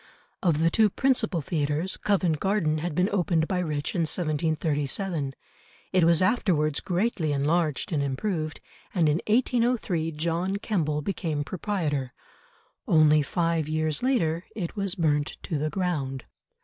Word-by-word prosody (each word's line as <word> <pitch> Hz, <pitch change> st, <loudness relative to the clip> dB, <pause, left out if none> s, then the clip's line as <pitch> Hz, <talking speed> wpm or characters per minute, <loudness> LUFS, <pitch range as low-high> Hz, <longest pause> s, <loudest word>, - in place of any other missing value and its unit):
Of 170 Hz, -5 st, +2 dB
the 165 Hz, 0 st, +3 dB
two 220 Hz, +2 st, +4 dB
principal 220 Hz, -, +1 dB
theatres, 155 Hz, +1 st, -1 dB
Covent 180 Hz, -7 st, +1 dB
Garden 190 Hz, -6 st, +1 dB
had 165 Hz, -1 st, -3 dB
been 180 Hz, +2 st, +3 dB
opened 175 Hz, -5 st, +1 dB
by 185 Hz, -, -1 dB
Rich 150 Hz, -5 st, -2 dB
in -, -, -1 dB
1737, 155 Hz, -1 st, -1 dB, 0.6 s
it 185 Hz, -2 st, +4 dB
was 170 Hz, +1 st, +4 dB
afterwards 165 Hz, -, +2 dB
greatly 180 Hz, -4 st, -1 dB
enlarged 150 Hz, +4 st, 0 dB
and 150 Hz, -4 st, +1 dB
improved, 155 Hz, +3 st, -2 dB, 0.3 s
and 170 Hz, -4 st, +3 dB
in 150 Hz, +3 st, +2 dB
1803 230 Hz, -7 st, +1 dB
John 170 Hz, +5 st, -1 dB
Kemble 155 Hz, -8 st, -1 dB
became 160 Hz, -6 st, -2 dB
proprietor. 150 Hz, -8 st, -2 dB, 0.7 s
Only 155 Hz, -1 st, +5 dB
five 165 Hz, +1 st, 0 dB
years 155 Hz, -1 st, 0 dB
later 175 Hz, -11 st, +1 dB
it 180 Hz, -6 st, -4 dB
was 195 Hz, -3 st, -1 dB
burnt 150 Hz, -3 st, 0 dB
to 155 Hz, -, -2 dB
the 155 Hz, +1 st, -1 dB
ground. 145 Hz, -9 st, -2 dB
165 Hz, 135 wpm, -26 LUFS, 150-190 Hz, 0.7 s, Only